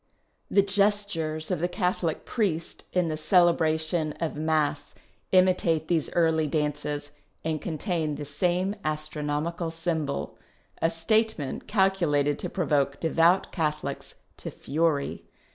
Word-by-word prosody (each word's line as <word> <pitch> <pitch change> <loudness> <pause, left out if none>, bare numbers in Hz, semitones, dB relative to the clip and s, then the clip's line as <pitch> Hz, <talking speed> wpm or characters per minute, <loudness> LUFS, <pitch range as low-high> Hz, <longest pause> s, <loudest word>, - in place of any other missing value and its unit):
The 200 - +4
gestures 195 -6 0
of - - 0
the 175 - +1
Catholic 180 -3 -1
priest 175 -8 -2
in 180 -2 +1
the 155 -1 -2
celebration 160 -2 +2
of 165 +1 -3
Mass 150 -2 0 0.4
imitate 180 -4 +3
these 165 -4 +1
early 160 -2 +2
dances 145 -1 -2 0.3
and 155 -1 -1
contain 160 -2 -2
the 145 - -6
same 180 +7 0
astronomical 155 +2 -2
symbol 160 -3 -3 0.2
— - - -31
a 165 - +3
statement 170 -1 0
calculated 170 -8 +2
to - - -4
provoke 140 -6 0
devout 165 +3 +3
Catholics 155 -4 -3 0.2
to - - -6
fury. 150 -1 -1
160 Hz, 120 wpm, -27 LUFS, 150-180 Hz, 0.4 s, The